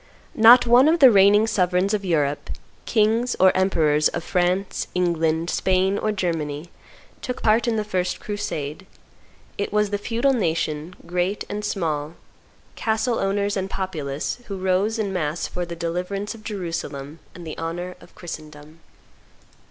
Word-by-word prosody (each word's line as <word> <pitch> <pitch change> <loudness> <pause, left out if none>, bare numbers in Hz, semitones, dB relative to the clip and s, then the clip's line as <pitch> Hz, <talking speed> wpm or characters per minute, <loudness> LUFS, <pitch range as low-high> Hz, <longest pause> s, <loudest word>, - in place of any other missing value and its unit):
Not 240 +3 +7
one 245 +4 +6
of 325 +2 +4
the 265 -4 +8
reigning 205 +1 +6
sovereigns 185 -1 +1
of 205 -1 -1
Europe, 150 -6 0 0.4
kings 225 +2 +2
or 190 0 +5
emperors, 155 -6 +3
of 165 - -4
France, 185 +2 0
England, 165 -2 0
Spain, 190 +1 +1
or 215 - 0
Germany, 165 -5 -3 0.5
took 250 -1 -5
part 225 +2 +3
in 235 - +1
the 215 - 0
first 185 -3 -2
crusade. 190 -5 -5 0.7
It 200 - -2
was 210 0 +1
the 205 - -1
feudal 235 +6 +1
nation, 165 - -2
great 180 +3 -1
and 210 +1 -4
small, 160 -6 -2 0.6
castle 220 +2 0
owners 200 +1 0
and 190 -1 -2
populace, 155 - -4
who 195 - -5
rose 190 +4 0
in 205 -3 -2
mass 160 -2 -2
for 175 -1 -4
the 170 - -6
deliverance 180 +5 -3
of 220 -1 -14
Jerusalem 165 -7 -5 0.2
and 175 -1 -10
the 155 - -6
honor 175 +2 -4
of - - -18
Christendom. 155 -2 -10
185 Hz, 150 wpm, -23 LUFS, 165-210 Hz, 0.7 s, the